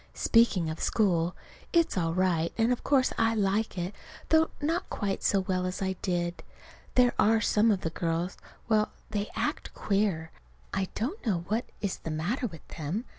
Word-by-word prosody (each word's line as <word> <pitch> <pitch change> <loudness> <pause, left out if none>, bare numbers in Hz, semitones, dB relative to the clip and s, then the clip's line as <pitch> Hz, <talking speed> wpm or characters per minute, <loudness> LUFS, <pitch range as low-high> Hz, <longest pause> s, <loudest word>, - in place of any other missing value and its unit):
Speaking 230 -7 +3
of 155 - -6
school, 180 -5 +1 0.4
it's 335 -2 +3
all 165 -3 0
right, 175 -3 +2
and 230 +1 +3
of 245 - -5
course 270 -3 +3
I 225 0 +3
like 205 0 0
it, 180 +3 -2 0.4
though 320 0 +5
not 325 +5 -1
quite 200 -2 -2
so 195 - +3
well 185 -1 -1
as 185 - -4
I 190 -1 0
did. 175 -1 -1 0.5
There 250 -1 +5
are 225 +2 +5
some 215 +1 +3
of 200 -3 +2
the 160 - -2
girls 170 +2 -1 0.3
well, 215 -2 +3 0.2
they 205 0 -2
act - - -2
queer. 195 -6 0 0.4
I 190 0 0
don't 285 - -3
know 180 -7 0
what 225 +3 0 0.2
is 200 -3 -1
the - - -6
matter 180 - -1
with 165 -7 -12
them. 170 - -2
195 Hz, 175 wpm, -29 LUFS, 175-225 Hz, 0.5 s, though